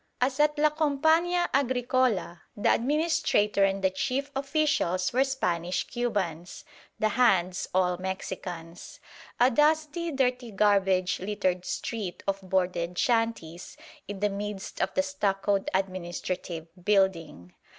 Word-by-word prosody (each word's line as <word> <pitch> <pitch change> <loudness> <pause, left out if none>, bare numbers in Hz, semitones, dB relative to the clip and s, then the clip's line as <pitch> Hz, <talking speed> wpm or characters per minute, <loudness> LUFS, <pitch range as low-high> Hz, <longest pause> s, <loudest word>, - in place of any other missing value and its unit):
As 260 +2 0
at 300 0 +3
La 300 0 +3
Compañía 320 +4 +2
Agricola, 250 -8 +1 0.2
the 205 - +3
administrator 260 -7 +1
and 195 0 +1
the 190 - +3
chief 270 +9 -2
officials 275 - 0
were 260 +2 +4
Spanish 180 -10 -1
Cubans, 190 -9 -3 0.3
the 215 - +1
"hands" 190 -6 +2
all 180 -1 +1
Mexicans. 180 -2 -6 0.4
A 250 +2 +5
dusty, 310 +4 +1
dirty 250 -3 0
garbage 195 -3 +2
littered 185 -2 -1
street 205 -7 -4
of 195 0 -1
boarded 180 -2 -1
shanties; 225 -9 -1 0.3
in 200 -1 -7
the 210 - +2
midst 200 0 -5
the 280 - +3
stuccoed 200 -8 0
administrative 180 -2 -3 0.2
building. 175 - 0
205 Hz, 115 wpm, -27 LUFS, 185-265 Hz, 0.4 s, A